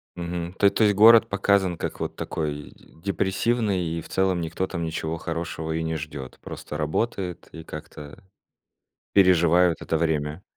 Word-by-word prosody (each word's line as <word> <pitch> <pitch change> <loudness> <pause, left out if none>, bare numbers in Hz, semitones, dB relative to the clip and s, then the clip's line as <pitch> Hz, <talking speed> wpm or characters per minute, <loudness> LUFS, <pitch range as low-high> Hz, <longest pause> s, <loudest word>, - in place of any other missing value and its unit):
Мгм. 85 0 -4
То 100 - +6
то 110 - +1
есть 105 -2 +4
город 115 +2 +7
показан 100 -3 +1
как - - -5
вот - - -3
такой 75 -2 -4
депрессивный 100 +3 -1
и 80 0 -3
в - - -13
целом 95 -2 +1
никто 85 +3 -2
там 85 -2 -4
ничего 80 0 -3
хорошего 80 -1 -4
и 80 0 -1
не 80 0 -2
ждет. 70 -4 -7
Просто 75 - -7
работают 90 +3 -2
и 80 -1 -9
как-то 75 -2 -10 0.9
переживают 90 -2 +5
это 80 - -1
время. 80 +1 -1
85 Hz, 155 wpm, -25 LUFS, 80-95 Hz, 0.9 s, город